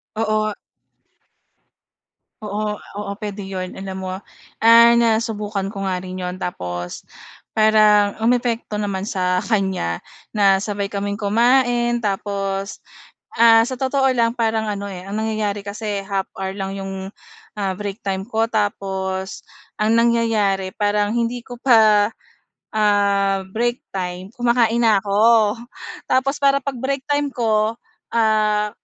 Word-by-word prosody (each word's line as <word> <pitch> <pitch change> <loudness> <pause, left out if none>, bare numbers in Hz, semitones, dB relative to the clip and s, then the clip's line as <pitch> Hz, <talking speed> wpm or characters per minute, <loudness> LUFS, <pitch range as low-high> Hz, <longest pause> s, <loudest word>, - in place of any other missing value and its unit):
Oo. 215 -1 0 1.9
Oo, 210 0 -2 0.2
oo 200 -1 -4
puwede 205 -1 -6
'yon. 185 -1 -5
Alam 190 -1 -6
mo, 185 - -4 0.5
ah, 230 +1 +7
nasubukan 215 -3 0
ko 195 -2 -4
nga 185 -1 -1
rin 185 0 -6
'yon 180 0 -4
tapos 90 - -5 0.5
parang 215 -1 +4
umepekto 235 -1 0
naman 200 -1 -2
sa 180 -3 0
kanya 190 - -1 0.3
na 195 -2 +4
sabay 200 0 -3
kaming 200 0 -2
kumain 240 +2 +2
tapos, 195 0 -3 0.5
ah, 225 0 +6
sa 260 - -3
totoo 265 +1 0
lang 235 0 +1
parang 220 -1 0
ano, 200 0 -4
eh, 185 -2 -7
ang 200 +3 -5
nangyayari 215 -2 -2
kasi 205 -1 -4
half 195 -1 -2
hour 190 0 -3
lang 195 0 -4
'yong, 195 0 -6 0.5
ah, 195 -2 -1
break 200 +1 -5
time 190 -1 -1
ko 225 +2 0
tapos 190 -3 -2 0.3
ang 220 +2 +2
nangyayari 220 -5 +2
parang 205 +1 0
hindi 235 +1 -2
ko 245 0 -10
pa, 220 -5 +5 0.6
ah, 200 -2 +2
break 240 +4 -1
time 185 0 -5
kumakain 235 -1 +2
na 215 -4 +4
'ko. 215 +1 +3 0.5
Tapos 270 +2 +1
para 275 -1 +3
'pag 275 -3 -4
break 270 +2 -2
time 290 -1 0
ko, 220 -2 +1 0.4
ah, 215 -2 +2
210 Hz, 130 wpm, -20 LUFS, 195-230 Hz, 1.9 s, ah